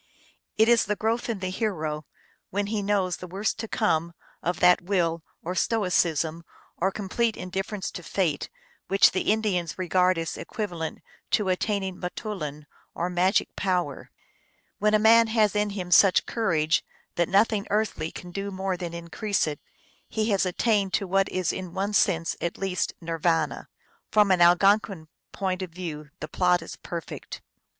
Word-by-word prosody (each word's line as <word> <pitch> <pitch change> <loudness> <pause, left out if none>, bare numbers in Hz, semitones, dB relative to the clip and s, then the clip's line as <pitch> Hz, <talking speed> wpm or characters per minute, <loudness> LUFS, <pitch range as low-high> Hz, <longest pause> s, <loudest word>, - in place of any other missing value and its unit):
It 220 - +5
is 235 -1 +5
the 210 +1 0
growth 225 +3 -1
in 215 -5 -3
the 185 -1 -2
hero, 160 -8 -2 0.4
when 205 +2 -1
he 210 0 -2
knows 195 -3 0
the 180 - -8
worst 195 +4 -2
to 225 - -4
come, 170 -8 0 0.3
of 175 +1 -2
that 180 0 +5
will, 175 -3 0 0.2
or 180 - -3
stoicism, 170 -6 +1 0.3
or 190 - +2
complete 215 +3 -1
indifference 190 +2 -4
to - - -7
fate, 170 -3 -1 0.4
which 195 +1 +5
the 190 - +1
Indians 195 -7 0
regard 185 0 +2
as 165 -1 -3
equivalent 175 -7 -5 0.3
to 205 -3 +1
attaining 190 0 -1
m 180 - 0
toulin, 150 -8 -5 0.3
or 175 +2 -2
magic 180 +3 +1
power. 180 -7 -1 0.7
When 210 +1 +3
a - - +7
man 225 +2 +6
has 220 -2 +2
in 210 0 +1
him 185 -3 -5
such 190 +1 +6
cour 225 -4 -1
age 155 0 +2 0.3
that 170 -1 0
nothing 200 +1 +2
earthly 210 -6 0
can 180 - -9
do 195 +2 -4
more 190 -1 -2
than 170 -2 -5
increase 170 +5 -1
it, 150 -2 -4 0.5
he 220 0 0
has 195 -1 +2
attained 200 +1 +1
to 200 - +1
what 195 +1 +1
is 185 -1 -1
in 185 -1 -6
one 200 +2 -1
sense 175 -6 +2
at 170 - -2
least 190 -2 -1
Nir 165 0 -4
vana. 165 0 0 0.4
From 210 -2 +4
an 180 -2 +3
Algonquin 180 -1 +4 0.2
point 190 -2 -2
of 185 - -4
view 165 -4 -7
the 155 - -4
plot 180 -1 +2
is - - -8
perfect. 170 -2 -7
185 Hz, 170 wpm, -26 LUFS, 170-205 Hz, 0.7 s, a